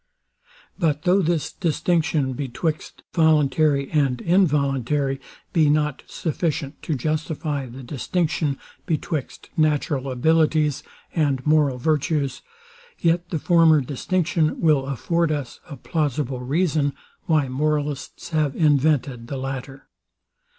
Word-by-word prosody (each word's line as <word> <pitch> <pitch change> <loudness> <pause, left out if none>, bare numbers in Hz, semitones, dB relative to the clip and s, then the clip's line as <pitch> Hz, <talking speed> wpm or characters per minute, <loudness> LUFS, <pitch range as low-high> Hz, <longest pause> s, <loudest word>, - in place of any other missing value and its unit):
But 150 -4 +1
though 185 +2 +4
this 160 -3 0
distinction 155 -4 0
betwixt 145 +4 -4
voluntary 150 -3 +3
and 135 -5 +1
involuntary 140 - +1 0.3
be 155 -3 +4
not 150 -2 +1
sufficient 155 -3 -3
to 160 - -2
justify 150 0 -2
the 130 +2 -10
distinction 150 +2 -1 0.3
betwixt 155 -4 -3
natural 145 -3 +1
abilities 155 +2 +2 0.3
and 140 -5 0
moral 150 -4 +3
virtues, 150 0 0 0.6
yet 170 +1 +1
the 165 - -1
former 165 -1 +5
distinction 155 +4 0
will 150 -5 +3
afford 165 +5 0
us 145 -5 -4
a 145 - -7
plausible 145 -5 -2
reason, 145 +1 0 0.3
why 155 -4 +2
moralists 145 +1 -2
have 155 -4 0
invented 140 -5 +2
the 140 - -4
latter. 135 +1 -6
150 Hz, 110 wpm, -23 LUFS, 135-160 Hz, 0.6 s, former